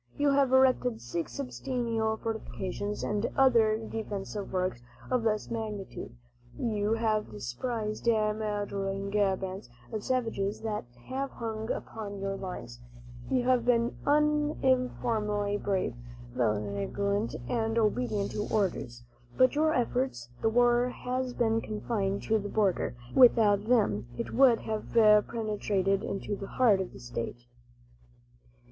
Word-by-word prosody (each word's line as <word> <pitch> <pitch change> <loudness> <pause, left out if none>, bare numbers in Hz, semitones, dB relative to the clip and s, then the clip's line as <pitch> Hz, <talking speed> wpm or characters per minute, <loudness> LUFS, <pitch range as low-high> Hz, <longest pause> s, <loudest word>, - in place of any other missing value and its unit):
You 290 -1 +3
have 275 -2 +3
erected 255 -2 +4
six 145 +8 -4
substantial 235 -5 -2
fortifications, 210 -2 -4
and 210 +2 0
other 230 -5 +5
defensive 210 -2 -5
works 185 -10 -1 0.3
of 250 -2 +2
less 215 -1 0
magnitude. 210 - -5 0.4
You 215 -2 0
have 220 -2 0
dispersed 210 - -4
marauding 205 -3 0
bands 190 -6 -1 0.2
of 215 -2 -3
savages 225 -5 -1
that 215 - -3 0.2
have 270 +1 -2
hung 220 -2 -5
upon 205 -2 -5
your 195 0 -2
lines. 180 -12 -7 0.5
You 255 -2 +2
have 250 -1 +3
been 240 0 +2
uniformly 255 -8 +1
brave, 195 -8 -1 0.4
vigilant 120 - -1
and 225 -1 0
obedient 215 -2 +1
to 210 - -3
orders. 135 - -1 0.3
By 255 0 +6
your 310 +2 +2
efforts, 245 - -1
the 225 - +3
war 240 +1 +4
has 250 0 -3
been 225 -1 +2
confined 210 -2 -2
to 220 0 +2
the 205 0 -5
border; 195 - +1 0.2
without 215 -5 +6
them, 165 - +2
it - - -4
would 250 -3 +5
have 215 -1 -4 0.3
penetrated 205 -3 0
into 200 +1 -3
the 195 0 -7
heart 215 -6 +3
of 185 - -5
the - - -12
state. 115 - -5
215 Hz, 125 wpm, -29 LUFS, 195-240 Hz, 0.5 s, By